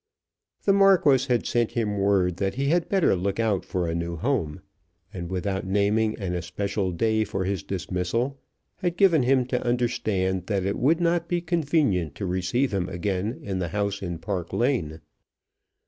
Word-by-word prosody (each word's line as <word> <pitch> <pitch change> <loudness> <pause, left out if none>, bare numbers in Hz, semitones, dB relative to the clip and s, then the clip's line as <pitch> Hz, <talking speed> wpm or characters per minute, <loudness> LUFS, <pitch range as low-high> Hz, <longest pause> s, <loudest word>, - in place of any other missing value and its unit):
The 195 - +4
Marquis 180 -10 +5
had 120 -3 +1
sent 120 -2 0
him 105 -4 -1
word 95 -3 +2
that 95 0 -1
he 140 +2 0
had 170 +1 +1
better 190 - +3
look 95 +3 -2
out 110 -4 +1
for 90 -2 -2
a 80 - -1
new 85 0 -3
home, 100 - -1 0.5
and 85 -2 -5
without 95 +1 -2
naming 105 +3 +1
an 95 -3 -3
especial 95 +3 -2
day 110 +5 +1
for 95 -2 -3
his 95 -2 -1
dismissal, 100 +9 -2 0.4
had 175 -1 -2
given 175 -6 +5
him 130 0 +3
to 125 0 -1
understand 110 -7 0
that 100 -3 0
it 100 - -1
would 160 +7 +3
not 170 0 +1
be 175 - +1
convenient 155 - 0
to 100 - -4
receive 95 +8 0
him 95 -2 -1
again 95 +5 -2
in 95 -2 -3
the 90 - -1
house 100 +2 -2
in 85 -3 -4
Park 85 0 -4
Lane. 90 - 0
100 Hz, 175 wpm, -25 LUFS, 90-130 Hz, 0.5 s, Marquis